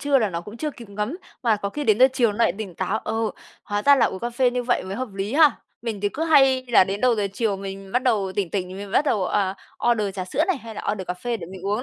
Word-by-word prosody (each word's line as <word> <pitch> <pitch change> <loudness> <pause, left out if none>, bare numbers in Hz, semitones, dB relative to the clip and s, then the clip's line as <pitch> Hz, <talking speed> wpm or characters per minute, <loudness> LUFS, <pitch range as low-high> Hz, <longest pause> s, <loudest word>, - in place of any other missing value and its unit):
trưa 285 -1 +3
là 215 -4 0
nó 170 -1 -3
cũng 210 +6 -10
chưa 305 +4 -2
kịp 235 -5 -12
ngấm, 210 - -3 0.3
mà 225 -4 +3
có 200 -1 -3
khi 295 +4 -4
đến 215 -1 +3
giờ 260 +1 +7
chiều 240 -5 +2
nó 205 - -9
lại 230 - +3
tỉnh 195 -6 -6
táo, 190 +5 -1
ờ, 220 - -4 0.5
hóa 205 0 -2
ra 285 0 +6
là 250 - +4
uống 190 - -5
cà 240 - -2
phê 245 +1 +2
như 245 0 -2
vậy 245 0 +1
mới 190 +1 -5
hợp 255 -1 -3
lý 200 +6 -3
ha. 310 -1 +7 0.3
Mình 220 -4 -4
thì 205 - +1
cứ 315 +9 -3
hay 270 -5 +5
là 230 - +6
đến 195 +2 -4
đầu 250 -1 +4
giờ 205 -2 0
chiều 210 -2 0
mình 195 0 -8
bắt 250 - +2
đầu 205 -7 +1
tỉnh 190 -3 -2
tỉnh 185 -3 -2
mình 200 0 -7
bắt 280 - +3
đầu, 210 -10 +1
à, 195 -1 0 0.4
order 210 -4 0
trà 185 -2 -3
sữa 300 - 0
này 375 - +1
hay 225 -2 -10
là - - -6
order 190 -3 -5
cà 180 - -2
phê 230 +6 -3
để 170 - -8
mình 190 -1 -9
uống 210 +5 0
215 Hz, 305 wpm, -23 LUFS, 195-250 Hz, 0.5 s, giờ